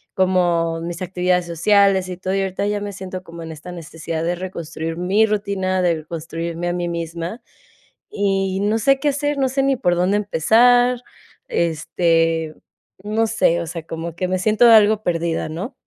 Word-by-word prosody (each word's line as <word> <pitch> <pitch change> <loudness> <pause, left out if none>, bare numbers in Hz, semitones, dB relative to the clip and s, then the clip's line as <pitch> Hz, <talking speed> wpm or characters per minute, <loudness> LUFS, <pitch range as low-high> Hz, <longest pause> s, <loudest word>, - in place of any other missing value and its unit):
como 175 -3 +1
mis 170 +2 -6
actividades 180 -1 0
sociales 190 +2 +3
y 180 - -4
todo, 185 0 -3
y 195 - +1
ahorita 190 +1 -2
ya 205 0 -1
me 205 0 -5
siento 185 -1 -7
como 170 -1 -10
en 160 - -7
esta 160 +3 -9
necesidad 165 0 -5
de 175 +1 0
reconstruir 165 -3 -5
mi 190 +5 +3
rutina, 200 -3 -1
de 175 -2 +2
reconstruirme 165 +2 -5
a - - -1
mí 175 -1 -2
misma. 170 +5 -5 0.7
Y 195 -1 0
no 210 +2 +1
sé 275 +5 +3
qué 295 - +1
hacer. 290 +1 -1
No 265 -1 +2
sé 270 +1 0
ni 270 -1 +2
por 175 -8 +1
dónde 185 +4 +2
empezar. 240 +6 +3 0.5
Este, 165 -1 0 0.5
no 220 +2 0
sé, 170 -6 +2
o 170 - -4
sea, 165 -2 -6
como 165 +1 -6
que 185 - -1
me 185 0 0
siento 215 +5 +4
algo 215 -1 +6
perdida, 165 -2 -1
¿no? 185 - -5
180 Hz, 180 wpm, -20 LUFS, 165-205 Hz, 0.7 s, algo